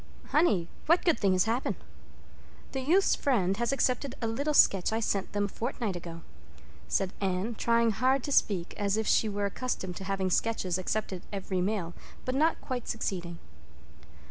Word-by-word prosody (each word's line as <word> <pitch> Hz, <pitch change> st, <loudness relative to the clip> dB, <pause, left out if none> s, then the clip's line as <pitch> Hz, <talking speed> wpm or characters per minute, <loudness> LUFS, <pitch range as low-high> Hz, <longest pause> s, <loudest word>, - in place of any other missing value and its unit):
"Honey, 210 Hz, -, +3 dB, 0.2 s
what 335 Hz, +3 st, +4 dB
good 335 Hz, -4 st, +3 dB
thing 195 Hz, -2 st, +3 dB
has 185 Hz, 0 st, +3 dB
happened?" 225 Hz, -3 st, 0 dB, 1.0 s
"The 265 Hz, -, -3 dB
Youth's 350 Hz, +9 st, +3 dB
Friend 195 Hz, -9 st, +1 dB
has 235 Hz, +3 st, 0 dB
accepted 270 Hz, 0 st, 0 dB
a 230 Hz, -, -2 dB
little 280 Hz, +7 st, -1 dB
sketch 195 Hz, -7 st, +5 dB
I 220 Hz, -, 0 dB
sent 200 Hz, -3 st, -1 dB
them 205 Hz, 0 st, +1 dB
a -, -, -2 dB
fortnight 225 Hz, -1 st, -3 dB
ago," 170 Hz, -1 st, -7 dB, 0.7 s
said 190 Hz, -, 0 dB
Anne, 190 Hz, +4 st, -1 dB
trying 230 Hz, +1 st, +2 dB
hard 260 Hz, +4 st, +2 dB
to 285 Hz, -, -4 dB
speak 185 Hz, -9 st, +1 dB
as 205 Hz, 0 st, 0 dB
if 220 Hz, -, 0 dB
she 220 Hz, -, +3 dB
were 205 Hz, 0 st, -1 dB
accustomed 200 Hz, -4 st, -3 dB
to -, -, -6 dB
having 190 Hz, -1 st, -1 dB
sketches 190 Hz, -4 st, 0 dB
accepted 190 Hz, -1 st, -2 dB
every 190 Hz, -2 st, -2 dB
mail, 185 Hz, -3 st, -1 dB, 0.3 s
but 255 Hz, -, -1 dB
not 310 Hz, +5 st, +2 dB
quite 250 Hz, -3 st, -4 dB
succeeding. 175 Hz, -6 st, -3 dB
210 Hz, 170 wpm, -29 LUFS, 190-255 Hz, 1.0 s, sketch